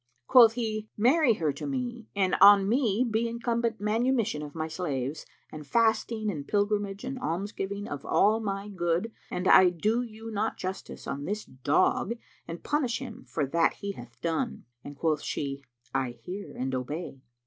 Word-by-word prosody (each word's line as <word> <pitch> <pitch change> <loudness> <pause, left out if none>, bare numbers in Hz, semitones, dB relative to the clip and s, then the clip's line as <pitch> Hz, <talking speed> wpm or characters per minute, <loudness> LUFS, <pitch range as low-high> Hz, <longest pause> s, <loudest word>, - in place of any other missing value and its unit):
Quoth 230 - +7
he, 215 -2 -3
"Marry 255 +4 +4
her 155 -6 0
to - - -6
me 245 -4 -4
and 190 -2 +2
on 200 0 +8
me 235 0 +2
be 225 +1 0
incumbent 235 -1 -1
manumission 220 - +1
of 150 0 -8
my 160 -1 -2
slaves 150 -4 -3 0.2
and 150 -2 -9
fasting 220 0 +1
and 145 -6 -6
pilgrimage 205 0 0
and 260 0 -4
almsgiving 200 +1 -3
of 145 -1 -6
all 215 +2 +3
my 200 -2 -3
good 175 +2 -1 0.2
an 180 +1 -2
I 185 - +8
do 210 +8 0
you 225 -1 -8
not 215 +1 -1
justice 190 +1 -6
on 140 +1 -4
this 210 +4 -3
dog 145 - +1 0.3
and 170 +1 -7
punish 265 -5 0
him 250 -5 -8
for 150 - -1
that 165 +5 +2
he 200 - -5
hath 120 -8 -12
done!" 170 +9 -2 0.2
And 145 - -9
quoth 155 -1 +1
she, 140 -1 -4 0.3
"I 130 -2 -1
hear 195 +3 -6
and 130 +1 -2
obey." 135 +2 -4
200 Hz, 170 wpm, -28 LUFS, 160-225 Hz, 0.3 s, on